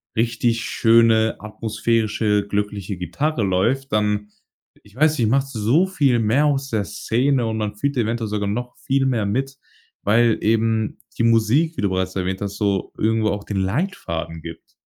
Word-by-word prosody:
richtig 115 Hz, 0 st, 0 dB
schöne, 115 Hz, -1 st, +3 dB
atmosphärische 110 Hz, -1 st, 0 dB
glückliche 100 Hz, -2 st, -3 dB
Gitarre 125 Hz, -, -2 dB
läuft, 115 Hz, +9 st, 0 dB
dann 105 Hz, -1 st, 0 dB, 0.5 s
ich 105 Hz, +2 st, -20 dB
weiß 155 Hz, +2 st, +3 dB
nicht, 115 Hz, -, +2 dB
macht 135 Hz, +2 st, +2 dB
so 130 Hz, -, +2 dB
viel 140 Hz, -10 st, +2 dB
mehr 115 Hz, +7 st, +2 dB
aus 140 Hz, -1 st, 0 dB
der 105 Hz, -3 st, -1 dB
Szene, 125 Hz, +2 st, 0 dB
und 110 Hz, 0 st, -2 dB
man 105 Hz, -1 st, -3 dB
fühlt 140 Hz, +5 st, -2 dB
eventuell 115 Hz, -1 st, -1 dB
sogar 105 Hz, -1 st, -2 dB
noch 125 Hz, +4 st, -4 dB
viel 135 Hz, 0 st, 0 dB
mehr 115 Hz, -5 st, 0 dB
mit, 135 Hz, +6 st, -2 dB, 0.5 s
weil 115 Hz, +2 st, +3 dB
eben 110 Hz, 0 st, +1 dB, 0.2 s
die 115 Hz, -, +1 dB
Musik, 115 Hz, +9 st, +3 dB
wie -, -, -2 dB
du 100 Hz, -, +1 dB
bereits 95 Hz, 0 st, -2 dB
erwähnt 95 Hz, +1 st, -2 dB
hast, 100 Hz, 0 st, -4 dB
so 100 Hz, -2 st, -1 dB
irgendwo 110 Hz, 0 st, +1 dB
auch 100 Hz, 0 st, -3 dB
den 100 Hz, -, -4 dB
Leitfaden 95 Hz, -, -3 dB
gibt. 85 Hz, -1 st, -10 dB
110 Hz, 165 wpm, -21 LUFS, 105-125 Hz, 0.5 s, schöne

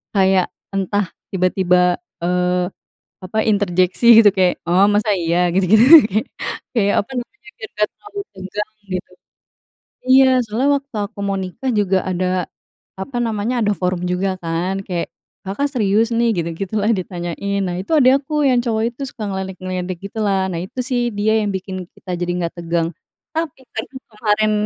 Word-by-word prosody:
kayak 190 Hz, -2 st, +3 dB, 0.2 s
entah 195 Hz, 0 st, -1 dB, 0.2 s
tiba-tiba, 180 Hz, -1 st, +2 dB, 0.2 s
eee, 180 Hz, +1 st, +1 dB, 0.5 s
apa, 185 Hz, +4 st, -4 dB
interjeksi, 195 Hz, 0 st, +1 dB, 0.2 s
gitu. 205 Hz, -, +6 dB
Kayak, 185 Hz, -2 st, +2 dB
“Oh, 185 Hz, +4 st, +4 dB
masa 210 Hz, 0 st, +2 dB
iya?" 175 Hz, 0 st, +1 dB
Gitu-gitu, 220 Hz, -, +7 dB
kayak 215 Hz, +4 st, 0 dB, 0.5 s
kayak, 205 Hz, -3 st, +2 dB
apa -, -, -27 dB
namanya, 420 Hz, -, -21 dB
biar 220 Hz, -, -9 dB
nggak 210 Hz, 0 st, +2 dB
terlalu 415 Hz, -1 st, -9 dB
tegang, 195 Hz, +3 st, -5 dB, 0.2 s
gitu. 185 Hz, 0 st, -4 dB, 1.0 s
Iya, 265 Hz, +1 st, +7 dB, 0.2 s
soalnya 225 Hz, +6 st, 0 dB
waktu 275 Hz, -2 st, -13 dB, 0.2 s
aku 220 Hz, -, -15 dB
mau 200 Hz, -, 0 dB
nikah, 190 Hz, +8 st, -4 dB
juga 195 Hz, -2 st, +2 dB
ada, 185 Hz, -1 st, -1 dB, 0.6 s
apa 245 Hz, +5 st, -5 dB
namanya, 230 Hz, +1 st, -1 dB
ada 205 Hz, -, +2 dB
forum 180 Hz, -1 st, -2 dB
juga, 185 Hz, +1 st, -1 dB
kan. 175 Hz, +3 st, -2 dB
Kayak, 175 Hz, -2 st, -3 dB, 0.4 s
“Kakak 205 Hz, +10 st, -1 dB
serius, 220 Hz, -3 st, +2 dB
nih?” 235 Hz, 0 st, +3 dB
Gitu-gitulah, 195 Hz, +6 st, -2 dB
ditanyain. 185 Hz, +2 st, -3 dB
Nah, 180 Hz, -2 st, -2 dB
itu 190 Hz, -, -7 dB
adik 270 Hz, 0 st, +5 dB
aku, 300 Hz, +1 st, -1 dB
yang 250 Hz, -2 st, +3 dB
cowok 225 Hz, -2 st, 0 dB
itu 280 Hz, -, -12 dB
suka 225 Hz, -4 st, -8 dB
ngeledek-ngeledek 185 Hz, -1 st, -4 dB
gitulah. 200 Hz, -3 st, 0 dB
Nah, 170 Hz, -, -3 dB
itu 190 Hz, +7 st, -8 dB
sih, 245 Hz, -1 st, 0 dB
dia 215 Hz, +2 st, +2 dB
yang 205 Hz, -, -1 dB
bikin 185 Hz, 0 st, -5 dB
kita 180 Hz, -2 st, -5 dB
jadi 175 Hz, 0 st, -1 dB
nggak 170 Hz, -1 st, -2 dB
tegang. 165 Hz, 0 st, 0 dB, 0.5 s
Tapi, 325 Hz, -4 st, -3 dB, 0.2 s
karena 220 Hz, -, -4 dB, 0.2 s
kemarin 215 Hz, 0 st, +1 dB
195 Hz, 155 wpm, -19 LUFS, 180-220 Hz, 1.0 s, Gitu-gitu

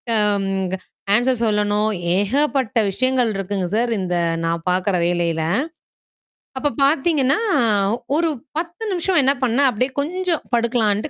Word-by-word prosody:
அம் 205 Hz, -2 st, +1 dB, 0.3 s
க -, -, -1 dB, 0.4 s
ஆன்ஸர் 245 Hz, +1 st, +1 dB
சொல்லணும். 210 Hz, 0 st, +1 dB, 0.3 s
ஏகப்பட்ட 260 Hz, +3 st, 0 dB
விஷயங்கள் 255 Hz, +2 st, +1 dB
இருக்குங்க 195 Hz, -1 st, -2 dB
சார், 235 Hz, +1 st, +1 dB
இந்த 180 Hz, -1 st, -2 dB, 0.3 s
நான் 165 Hz, 0 st, -1 dB
பாக்குற 185 Hz, +2 st, +1 dB
வேலையில. 170 Hz, -2 st, 0 dB, 1.1 s
அப்பப் 275 Hz, -2 st, -2 dB
பாத்தீங்கன்னா, 280 Hz, 0 st, +2 dB, 0.8 s
ஒரு 330 Hz, 0 st, +1 dB, 0.3 s
10 340 Hz, +5 st, -4 dB
நிமிஷம் 360 Hz, -1 st, +1 dB
என்ன 270 Hz, +1 st, +4 dB
பண்ணேன். 255 Hz, +3 st, +3 dB
அப்பிடியே 250 Hz, +3 st, -1 dB
கொஞ்சம் 355 Hz, +2 st, -2 dB
படுக்கலான்ட்டு, 230 Hz, 0 st, +1 dB
235 Hz, 120 wpm, -20 LUFS, 205-280 Hz, 1.1 s, என்ன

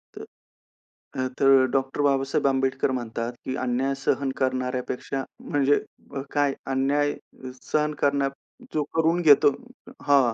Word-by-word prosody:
तर, -, -, -8 dB, 0.9 s
अ, 130 Hz, -, +1 dB
तर 135 Hz, -1 st, +6 dB
डॉक्टर 135 Hz, +1 st, -1 dB
बाबासाहेब 140 Hz, -1 st, +1 dB
आंबेडकर 135 Hz, 0 st, +1 dB
म्हणतात, 120 Hz, -1 st, -3 dB
की 130 Hz, -, -2 dB
अन्याय 130 Hz, +2 st, 0 dB
सहन 140 Hz, -1 st, +1 dB
करणाऱ्यापेक्षा, 130 Hz, +1 st, -2 dB, 0.3 s
म्हणजे 145 Hz, -2 st, +3 dB, 0.4 s
अ, 135 Hz, -, -2 dB
काय, 145 Hz, -2 st, +2 dB, 0.2 s
अन्याय 145 Hz, +2 st, +1 dB, 0.6 s
सहन 150 Hz, 0 st, +1 dB
करण्या 140 Hz, -1 st, +2 dB, 0.4 s
जो 155 Hz, -, +1 dB
करून 165 Hz, +2 st, +2 dB
घेतो 145 Hz, -3 st, +7 dB, 0.5 s
हां, 135 Hz, -5 st, +4 dB
135 Hz, 120 wpm, -25 LUFS, 130-145 Hz, 0.9 s, घेतो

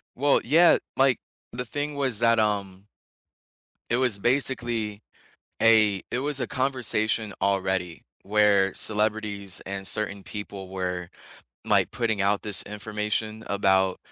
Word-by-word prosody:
Well, 140 Hz, +2 st, +3 dB
yeah, 165 Hz, +7 st, +6 dB, 0.2 s
like, 135 Hz, -1 st, +3 dB, 0.3 s
the 125 Hz, +1 st, -3 dB
thing 145 Hz, +4 st, -4 dB
was 130 Hz, -6 st, -1 dB
that, 115 Hz, -1 st, +4 dB
um 100 Hz, -2 st, -1 dB, 1.0 s
it 120 Hz, -, +2 dB
was 125 Hz, -5 st, +1 dB
basically 120 Hz, -4 st, 0 dB, 0.6 s
a 110 Hz, -3 st, +5 dB
it 120 Hz, -, -1 dB
was 140 Hz, +1 st, -2 dB
a 125 Hz, -, -1 dB
conversation 115 Hz, -5 st, -1 dB
already 95 Hz, -3 st, -1 dB, 0.2 s
where 100 Hz, -2 st, +3 dB
celebrities 105 Hz, -3 st, -2 dB
and 95 Hz, 0 st, -4 dB
certain 100 Hz, -1 st, -2 dB
people 100 Hz, -2 st, -7 dB
were, 90 Hz, -2 st, -4 dB, 0.6 s
like, -, -, +3 dB
putting 110 Hz, -4 st, -1 dB
out 100 Hz, +1 st, +1 dB
this 105 Hz, -2 st, +1 dB
information 105 Hz, +1 st, -3 dB
about 95 Hz, -2 st, +2 dB
105 Hz, 125 wpm, -25 LUFS, 100-120 Hz, 1.0 s, yeah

